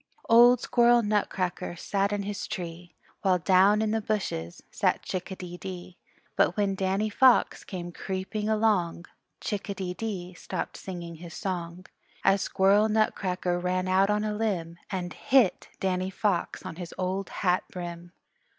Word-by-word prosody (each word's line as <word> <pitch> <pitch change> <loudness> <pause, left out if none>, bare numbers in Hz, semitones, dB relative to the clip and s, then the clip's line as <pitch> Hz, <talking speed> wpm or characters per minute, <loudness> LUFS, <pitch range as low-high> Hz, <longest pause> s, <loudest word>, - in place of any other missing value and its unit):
Old 240 +1 +7
Squirrel 240 -1 +4
Nutcracker 195 -4 -1
sat 200 +3 -1
in 205 -1 -1
his 205 0 -4
tree, 175 -4 -6 0.3
While 185 -2 +3
down 195 +4 +4
in 215 - 0
the 220 0 0
bushes 195 - -3
sat - - +1
Chick 185 0 -4
a 190 - -5
dee 175 -1 -8
dee; 180 0 -8 0.4
But - - +2
when 200 -1 +2
Danny 195 +2 0
Fox 250 +4 +4
came 175 -2 -6
creeping 195 +4 -3
along 210 -6 +1 0.4
Chick 205 0 -3
a 200 - -2
dee 185 -1 -3
dee 185 -4 -5
stopped - - -5
singing 170 -3 -7
his 170 +1 -10
song, 180 -1 -4 0.4
As 195 0 +4
Squirrel 200 +3 +3
Nutcracker 185 -4 0
ran 185 +1 -1
out 190 +2 +3
on 210 0 +1
a 215 -1 -1
limb 185 -6 -2
And 180 -2 -3
hit 255 -8 +2
Danny 185 0 0
Fox 195 -1 -1
on 165 - -6
his 175 -2 -7
old 190 +1 -2
hat 180 -1 +1
brim. 175 -1 -7
190 Hz, 160 wpm, -27 LUFS, 180-210 Hz, 0.4 s, Old